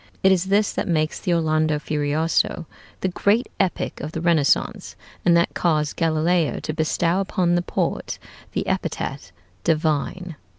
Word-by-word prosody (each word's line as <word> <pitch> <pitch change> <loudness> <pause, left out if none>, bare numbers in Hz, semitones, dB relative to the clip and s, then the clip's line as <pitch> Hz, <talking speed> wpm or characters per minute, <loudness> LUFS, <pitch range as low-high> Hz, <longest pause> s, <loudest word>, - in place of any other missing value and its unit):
It 190 - +6
is 185 -1 +2
this 200 +2 +2
that - - -2
makes 155 -3 0
the 180 - -2
'Orlando 155 -2 +2
Furioso' 150 +3 0 0.4
the - - +1
great 205 +6 +1
epic 190 -2 -1
of 155 +1 -5
the - - -3
Renaissance, 160 -4 +1 0.3
and 170 -1 +5
that 170 - +1
caused 155 -4 +1
Galileo 165 0 +1
to 155 - -3
bestow 165 +3 +1
upon 185 -2 +1
the 175 - +2
poet - - -2 0.4
the - - -1
epithet - - -3 0.3
"divine." 160 +2 0
165 Hz, 145 wpm, -23 LUFS, 155-180 Hz, 0.4 s, It